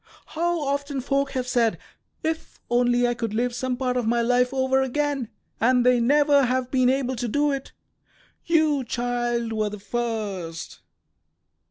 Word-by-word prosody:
How 345 Hz, +1 st, 0 dB
often 280 Hz, 0 st, -2 dB
folk 275 Hz, +1 st, -1 dB
have 255 Hz, -1 st, -2 dB
said, 235 Hz, -3 st, +2 dB, 0.5 s
'If 320 Hz, 0 st, -3 dB
only 245 Hz, 0 st, +3 dB
I 240 Hz, -, +1 dB
could 230 Hz, -3 st, -4 dB
live 245 Hz, +2 st, 0 dB
some 250 Hz, 0 st, -2 dB
part 250 Hz, -1 st, -1 dB
of 240 Hz, -3 st, -1 dB
my 235 Hz, +1 st, +2 dB
life 250 Hz, +1 st, +2 dB
over 265 Hz, 0 st, +2 dB
again!' 275 Hz, -2 st, -1 dB, 0.3 s
and 250 Hz, +1 st, +3 dB
they 250 Hz, -1 st, +5 dB
never 285 Hz, +2 st, +4 dB
have 255 Hz, 0 st, -1 dB
been 255 Hz, -2 st, +3 dB
able 260 Hz, -1 st, 0 dB
to 240 Hz, 0 st, -3 dB
do 290 Hz, +5 st, +1 dB
it. 275 Hz, -1 st, -4 dB, 0.7 s
You, 310 Hz, -4 st, +2 dB
child, 240 Hz, -1 st, -2 dB
were 215 Hz, -1 st, 0 dB
the 210 Hz, -, -7 dB
first." 200 Hz, -7 st, -4 dB
250 Hz, 160 wpm, -24 LUFS, 240-275 Hz, 0.7 s, they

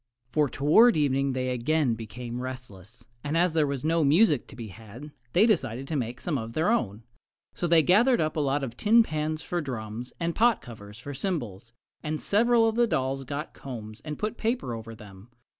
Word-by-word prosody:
For 150 Hz, 0 st, +2 dB
toward 160 Hz, -, +5 dB
evening 140 Hz, -2 st, +1 dB
they 130 Hz, 0 st, -1 dB
again 130 Hz, +2 st, +1 dB
became 115 Hz, +2 st, -6 dB
restless, 120 Hz, -5 st, -9 dB, 0.2 s
and 150 Hz, +2 st, -1 dB
as 175 Hz, -1 st, +2 dB
there 155 Hz, -2 st, +2 dB
was 140 Hz, -2 st, -3 dB
no 165 Hz, +1 st, +2 dB
music 150 Hz, -, +3 dB
to -, -, -13 dB
be 115 Hz, -3 st, -7 dB
had 115 Hz, -, -11 dB, 0.2 s
they 195 Hz, +5 st, +5 dB
decided 135 Hz, -, 0 dB
to 160 Hz, -, -2 dB
make 120 Hz, -3 st, -3 dB
some 150 Hz, -6 st, -2 dB
of 115 Hz, 0 st, -6 dB
their 160 Hz, -, +1 dB
own. 110 Hz, -, -1 dB, 0.5 s
So 175 Hz, -, -2 dB
they 165 Hz, -1 st, +5 dB
gathered 235 Hz, -, +4 dB
up 155 Hz, 0 st, 0 dB
a -, -, -1 dB
lot 140 Hz, 0 st, 0 dB
of 120 Hz, -3 st, -5 dB
tin 230 Hz, -, +5 dB
pans 155 Hz, -3 st, -3 dB
for 175 Hz, -1 st, -2 dB
drums 120 Hz, -3 st, -6 dB
and 170 Hz, -1 st, -1 dB
pot 230 Hz, +2 st, +3 dB
covers 105 Hz, -3 st, -11 dB
for 140 Hz, +4 st, -8 dB
cymbals, 120 Hz, -, -4 dB, 0.3 s
and 155 Hz, 0 st, -3 dB
several 230 Hz, +2 st, +3 dB
of 220 Hz, -, 0 dB
the 240 Hz, 0 st, +4 dB
dolls 135 Hz, -6 st, -1 dB
got 145 Hz, +4 st, -5 dB
combs 110 Hz, -5 st, -9 dB
and 150 Hz, -1 st, -5 dB
put 215 Hz, +2 st, -3 dB
paper 230 Hz, -, -1 dB
over 115 Hz, 0 st, -7 dB
them. 105 Hz, -1 st, -14 dB
140 Hz, 200 wpm, -27 LUFS, 120-165 Hz, 0.5 s, toward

